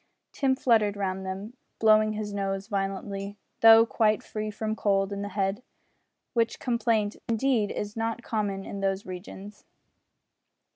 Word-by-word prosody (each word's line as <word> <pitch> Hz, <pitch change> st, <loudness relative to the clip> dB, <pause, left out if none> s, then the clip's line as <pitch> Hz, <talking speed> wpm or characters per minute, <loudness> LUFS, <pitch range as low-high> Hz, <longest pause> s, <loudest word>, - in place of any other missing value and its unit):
Tim 265 Hz, -2 st, +1 dB
fluttered 220 Hz, -6 st, +2 dB
round 190 Hz, -1 st, -3 dB
them, 195 Hz, +5 st, -6 dB, 0.2 s
blowing 215 Hz, -1 st, +4 dB
his 210 Hz, -1 st, -4 dB
nose 195 Hz, -1 st, -2 dB
violently 195 Hz, 0 st, -3 dB, 0.2 s
though 225 Hz, 0 st, +8 dB
quite 215 Hz, -2 st, +1 dB
free 215 Hz, 0 st, -4 dB
from 215 Hz, +1 st, -3 dB
cold 195 Hz, -2 st, +1 dB
in 200 Hz, -, -4 dB
the 205 Hz, -, -4 dB
head 195 Hz, +1 st, -1 dB, 0.7 s
which 230 Hz, -2 st, +1 dB
complaint, 230 Hz, -4 st, 0 dB
indeed, 230 Hz, -2 st, +1 dB
is 205 Hz, 0 st, -4 dB
not 225 Hz, +1 st, -2 dB
common 205 Hz, -4 st, -2 dB
in 200 Hz, -, -6 dB
those 195 Hz, 0 st, -1 dB
regions. 190 Hz, +3 st, -9 dB
210 Hz, 140 wpm, -27 LUFS, 195-225 Hz, 0.7 s, though